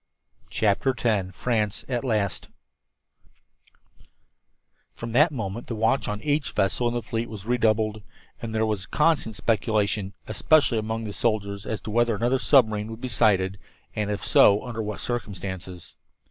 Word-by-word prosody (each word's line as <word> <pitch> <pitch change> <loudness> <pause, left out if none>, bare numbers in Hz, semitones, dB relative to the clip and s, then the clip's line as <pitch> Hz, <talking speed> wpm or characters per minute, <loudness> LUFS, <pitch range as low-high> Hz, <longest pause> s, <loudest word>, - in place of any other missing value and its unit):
CHAPTER 110 +5 +1
X 105 -6 +1
FRANCE 110 -5 -1
AT 125 -1 -2
LAST 105 -6 -1 2.5
From 115 0 -6
that 150 +8 +4
moment 115 -3 -5
the 120 - -4
watch 115 +5 +1
on 105 0 -4
each 145 -1 0
vessel 95 +5 +1
in 120 - -2
the 120 - -2
fleet 115 +1 -3
was 105 -3 -9
redoubled, 110 -2 +1 0.4
and 110 -1 -5
there 110 0 +2
was 105 -4 -2
constant 150 -8 +1
speculation, 105 -3 0
especially 115 +2 +3
among 110 +1 -3
the 105 -2 -5
soldiers, 100 -3 -1
as 110 - -3
to 110 - -6
whether 120 0 +2
another 120 +5 +1
submarine 110 -7 +3
would 115 +1 -8
be 130 - -4
sighted, 100 -5 +2 0.4
and, 105 -1 -1
if 105 -1 -3
so, 100 +3 +5
under 115 -2 -4
what 105 -1 -4
circumstances. 95 -6 -5
110 Hz, 150 wpm, -25 LUFS, 105-120 Hz, 2.5 s, so